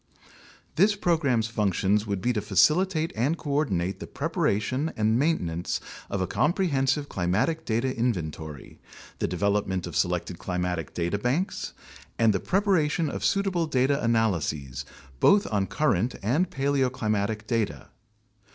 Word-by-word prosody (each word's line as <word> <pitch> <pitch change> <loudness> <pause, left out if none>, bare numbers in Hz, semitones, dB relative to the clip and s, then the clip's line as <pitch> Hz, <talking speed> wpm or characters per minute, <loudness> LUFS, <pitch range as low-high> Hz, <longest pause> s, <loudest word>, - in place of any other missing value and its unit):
This 205 +5 +5
program's 155 - +1
functions 105 -1 +1
would 100 -2 -2
be 125 +4 +1
to 105 - -1
facilitate 155 - +2
and 135 +9 +1
coordinate 135 - -1
the - - -7
preparation 130 +10 -1
and 110 +2 +2
maintenance 90 - 0 0.3
of 100 - -2
a - - +1
comprehensive 145 - +1
climatic 110 - 0
data 115 +4 0
inven 115 -11 -1
tory, 75 -3 -10 0.4
the - - 0
development 95 0 0
of - - -7
selected 90 -1 -1
climatic 90 -3 -3
data 85 +4 -1
banks, 135 - -1 0.4
and 115 -2 +4
the 95 - 0
prepara 190 - +2
tion 155 -1 -1
of - - -5
suitable 190 -4 +1
data 140 0 +1
analyses, 80 - 0 0.3
based 200 - +5
on 100 -3 0
both - - -13
current 125 - +2
and 150 - +1
paleoclimatic 125 - 0
data. 115 -2 -2
115 Hz, 135 wpm, -26 LUFS, 95-150 Hz, 0.4 s, This